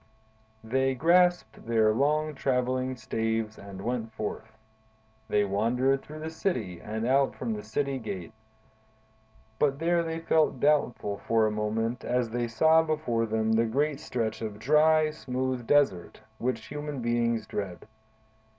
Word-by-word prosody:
"They 130 +3 +1
grasped 175 -7 +2
their 110 -2 +3
long 150 +5 +1
traveling 130 -1 0
staves 110 -1 -2
and 100 -1 -9
went 115 -1 -2
forth. 110 +1 -6 0.7
They 105 -1 +2
wandered 125 +7 +1
through 155 +1 -10
the 160 +1 -5
city 115 - -2
and 110 +2 -4
out 135 +2 +2
from 120 -3 -3
the 105 - -5
city 135 +6 -2
gate; 95 -4 -6 1.3
but 140 -2 +2
there 170 +2 +2
they 165 -1 -3
felt 160 -4 +1
doubtful 120 -9 +1
for 115 -1 +3
a 110 - +1
moment 110 +3 -2
as 125 -2 0
they 120 0 -1
saw 160 +8 +4
before 150 -8 -1
them 110 0 0
the 115 +1 +3
great 140 +5 0
stretch 115 -8 -3
of 105 -2 -4
dry, 155 +5 +4
smooth 130 -4 -3
desert, 135 -12 +2 0.2
which 130 +1 -2
human 145 -1 -5
beings 120 -1 0
dread. 95 -4 -5
125 Hz, 140 wpm, -28 LUFS, 110-145 Hz, 1.3 s, saw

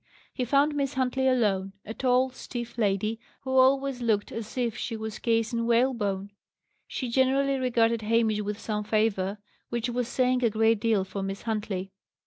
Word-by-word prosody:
He 250 - -2
found 280 +4 +3
Miss 280 -1 -1
Huntley 265 0 +1
alone; 200 -7 +1
a 220 - -5
tall, 255 +1 +2
stiff 240 -2 -7
lady, 215 0 0 0.2
who 260 - -5
always 265 0 +3
looked 220 -3 +1
as 225 +1 -6
if 240 -3 0
she 230 -2 -4
were 220 0 -4
cased 225 +1 0
in 230 0 0
whalebone. 230 -5 +1 0.6
She 255 - -4
generally 270 +2 +2
regarded 230 -3 +2
Hamish 220 -1 +2
with 205 0 -3
some 210 -2 -2
favour, 210 -2 0 0.3
which 235 0 -2
was 245 0 -1
saying 255 0 +1
a 235 - +4
great 220 0 +2
deal 220 -3 +2
for 195 +1 -5
Miss 195 +1 -4
Huntley. 205 -4 -3
230 Hz, 170 wpm, -27 LUFS, 210-255 Hz, 0.6 s, a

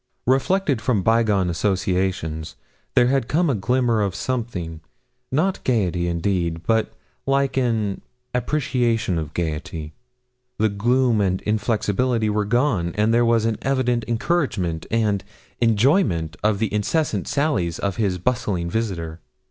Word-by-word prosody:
Reflected 135 +1 +2
from 110 -4 +1
bygone 110 -4 +3
associations, 90 -3 -1 0.4
there 120 - +6
had 130 -1 +1
come 165 0 +2
a - - +1
glimmer 120 +1 +1
of 100 -3 -1
something, 95 -11 -3 0.5
not 175 +8 0
gaiety, 90 -8 +1
indeed, 85 -1 -1
but 110 -1 +1 0.4
like 135 -1 +1
an 115 -6 0 0.3
appreciation 120 - 0
of 80 -1 -6
gaiety. 80 -1 -4 0.6
The 110 +1 +2
gloom 120 +2 +2
and 95 -1 +1
inflexibility 110 +1 0
were 105 0 0
gone, 105 - +1
and 110 +2 +3
there 120 +1 +4
was 115 -1 +3
an 115 -2 0
evident 125 -3 +1
encouragement 115 - -1
and 105 -3 +1 0.4
enjoyment 110 - +2
of 105 -1 +2
the 110 0 -1
incessant 105 - 0
sallies 105 - 0
of 100 -2 -2
his 100 -5 0
bustling 90 -5 -1
visitor. 85 -8 -3
110 Hz, 130 wpm, -22 LUFS, 90-125 Hz, 0.6 s, there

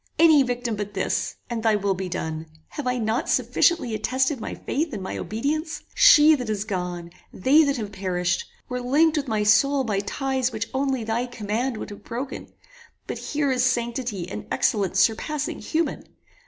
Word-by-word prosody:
Any 315 -3 +7
victim 245 -3 -1
but 205 0 -5
this, 190 - -1
and 235 -2 -3
thy 220 -1 +3
will 200 -1 +1
be 190 0 -4
done. 160 -1 -4 0.2
Have 290 -4 -5
I 250 0 +1
not 225 0 -1
sufficiently 335 -10 +2
attested 260 +4 0
my - - -5
faith 305 +1 -2
and 200 -3 -4
my 190 - -4
obedience? 305 +8 -3
She 315 -12 +7
that 250 -6 -2
is 210 -2 -1
gone, 180 -4 -4 0.2
they 280 +10 +4
that 280 -1 0
have 210 -3 -5
perished, 185 - -1 0.2
were 250 0 -3
linked 300 +6 +3
with 290 -2 -1
my 215 -3 0
soul 270 +7 +4
by 210 -5 -1
ties 260 +4 -1
which 225 0 -4
only 265 -2 0
thy 225 +3 -1
command 235 +1 -2
would - - -7
have 205 - -11
broken; 255 +4 -6 0.5
but - - -5
here 290 -2 -1
is 250 -1 +1
sanctity 235 -6 -1
and 190 - -7
excellence 195 -3 +1
surpassing 290 +8 0
human. 325 0 -2
240 Hz, 180 wpm, -24 LUFS, 205-275 Hz, 0.5 s, Any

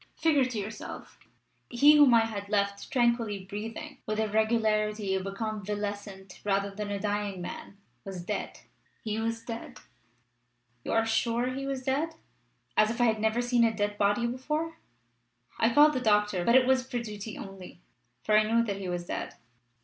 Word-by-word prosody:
Figure 295 -5 +3
to 250 -3 -4
yourself! 210 +1 -7 0.5
He 285 +5 +6
whom 290 -3 +7
I 225 -1 +5
had 205 -3 -6
left 200 -1 -1
tranquilly 235 -6 +1
breathing, 225 +8 -7
with 215 0 -1
the 220 0 +1
regularity 215 -2 +1
of 190 0 -2
a - - -3
convalescent 205 -2 -5
rather 200 0 0
than 205 +1 -5
a 200 -1 -2
dying 205 -2 -2
man, 180 +2 -7 0.3
was 190 -3 -7
dead! - - -4 0.4
He 215 0 -2
was 230 0 -2
dead!" 230 -1 -7 1.0
"You - - -4
are 225 0 +3
sure 230 +2 +1
he 275 +1 -4
was 270 -1 -3
dead?" 295 +5 -1 0.6
"As 215 - +4
if 230 - -4
I 240 - +4
had 220 -2 +2
never 220 +2 +1
seen 240 -1 +3
a 230 - +4
dead 205 0 -2
body 205 +4 +2
before! 300 +7 -2 0.8
I 225 - +3
called 295 +4 +6
the 255 - -1
doctor, 210 -5 +2
but 235 +6 +4
it 260 -1 +6
was 260 0 +3
for 245 - -2
duty 215 -2 -6
only, 195 -3 -10 0.4
for 215 - +2
I 215 - +7
knew 230 0 +4
that 200 -4 -3
he 190 -2 -5
was 175 -1 -3
dead." - - -5
220 Hz, 180 wpm, -29 LUFS, 205-240 Hz, 1.0 s, whom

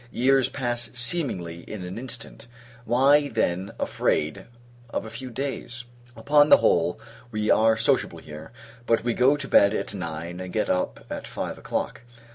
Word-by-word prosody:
Years 130 +1 +3
pass 120 -3 -2
seemingly 120 - -1
in 105 -4 -6
an 90 +5 -6
instant; 120 -1 -7 0.4
why, 140 +5 +4
then, 95 -6 -1
afraid 75 0 -1 0.4
of - - -3
a 110 - -8
few 125 +3 -7
days? 125 -1 -5 0.3
Upon 145 0 +4
the - - +9
whole, - - +2 0.3
we 110 -2 0
are 110 0 +4
sociable 110 - +1
here; 75 +5 -10 0.4
but 115 -1 +2
we 120 -1 0
go 130 +5 +4
to 140 -2 -5
bed 100 -3 +5
at - - -2
nine, 85 -1 -5
and 90 -1 -6
get 110 - 0
up 90 -10 -2
at - - -5
five - - -5
o'clock. - - -3
115 Hz, 160 wpm, -25 LUFS, 95-130 Hz, 0.4 s, the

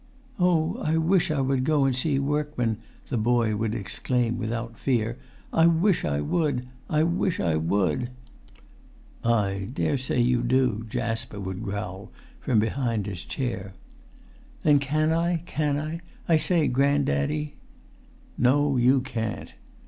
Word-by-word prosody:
"Oh! 175 -3 +2
I 160 +1 +1
wish 165 +2 +2
I 150 -3 +1
would 135 -1 +1
go 145 -1 +3
and 135 -2 +2
see 135 +2 +1
workman," 140 -5 -1 0.3
the 125 - 0
boy 115 -1 +2
would 110 +1 -1
exclaim 120 +3 -1
without 115 0 -4
fear. 120 -2 0 0.3
"I 165 0 +5
wish 170 +3 +3
I 70 -1 0
would! 130 - 0 0.2
I 155 0 +3
wish 170 +1 0
I 85 -3 +1
would!" 100 +8 0 1.1
"I 100 -4 +1
daresay 130 -2 -1
you 120 0 +3
do," 120 -3 +1
Jasper 115 -2 -3
would 95 0 -5
growl 100 -2 -5 0.3
from 115 -4 +2
his 110 -6 -2
chair. 110 -8 -4 0.9
"Then 145 -2 +5
can 155 +3 +1
I; 165 0 +1
can 150 -3 0
I, 155 +3 -4 0.3
I 165 - +5
say, 160 0 +2
grand 140 +2 +2
daddy?" 75 +2 -1 0.9
"No, 140 +2 +3
you 125 +2 +4
can't." 115 -4 -4
125 Hz, 135 wpm, -26 LUFS, 110-150 Hz, 1.1 s, I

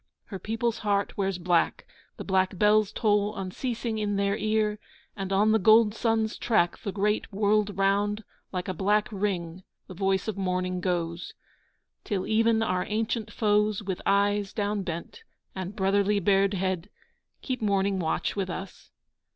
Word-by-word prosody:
Her 195 - -7
people's 225 +2 -2
heart 200 -1 0
wears 195 -2 -1
black, 175 -1 +1 0.3
The - - -6
black 190 -1 +1
bells 210 +1 +4
toll 210 -1 +1
unceasing 220 +4 -3
in 205 -1 -1
their 200 0 +1
ear, 215 -1 0 0.4
And 195 -2 -5
on 205 +3 +3
the 220 - +4
gold 215 +1 +5
sun's 225 -1 0
track 195 -7 +1
The 200 - -4
great 210 +3 0
world 205 0 +1
round 205 +2 +1 0.3
Like 180 -1 -3
a 185 - -2
black 205 +4 +1
ring 190 -4 -2 0.2
the - - -10
voice 190 +2 0
of 205 -2 -3
mourning 185 -1 -1
goes, 170 -2 -2 0.7
Till 195 -4 -2
even 225 0 +2
our 185 -3 0
ancient 220 +1 -2
foes 210 -1 +1
With 190 -2 -4
eyes 200 0 +2
downbent, 205 - -3 0.3
and 190 +1 -5
brotherly 200 0 +2
bared 195 +1 +2
head, 185 0 -2 0.5
Keep 255 -3 -3
mourning 200 -2 +1
watch 160 -2 -1
with 195 -2 -2
us. 190 +1 -7
200 Hz, 150 wpm, -27 LUFS, 190-215 Hz, 0.7 s, gold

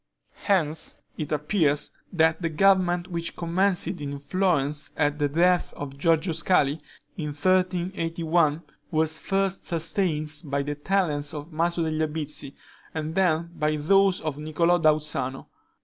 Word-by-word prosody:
Hence, 160 -6 0 0.2
it 155 -1 -5
appears, 150 -1 +1 0.2
that 160 -1 +2
the 165 - 0
government 180 +1 +3
which 170 -1 -3
commenced 180 +2 +1
in 145 -6 -4
Florence 150 -2 0
at 145 0 +1
the 145 -1 +1
death 175 +4 +2
of 140 -1 -6
Giorgio 165 +3 +2
Scali, 155 -3 +2 0.4
in 160 - -3
1381, 170 -1 +1 0.3
was 160 -1 0
first 195 0 -1
sustained 160 -2 -1
by 140 -1 -1
the 145 +1 -3
talents 150 -2 -1
of 150 +3 -7
Maso 170 +2 0
degli 155 -1 -1
Albizzi, 150 -2 -4 0.4
and 155 0 -3
then 170 -2 +1
by 150 0 0
those 195 +5 +3
of 155 -2 -4
Niccolo 170 +3 +2
da 155 -2 +5
Uzzano. 135 -3 -3
160 Hz, 135 wpm, -26 LUFS, 150-180 Hz, 0.4 s, da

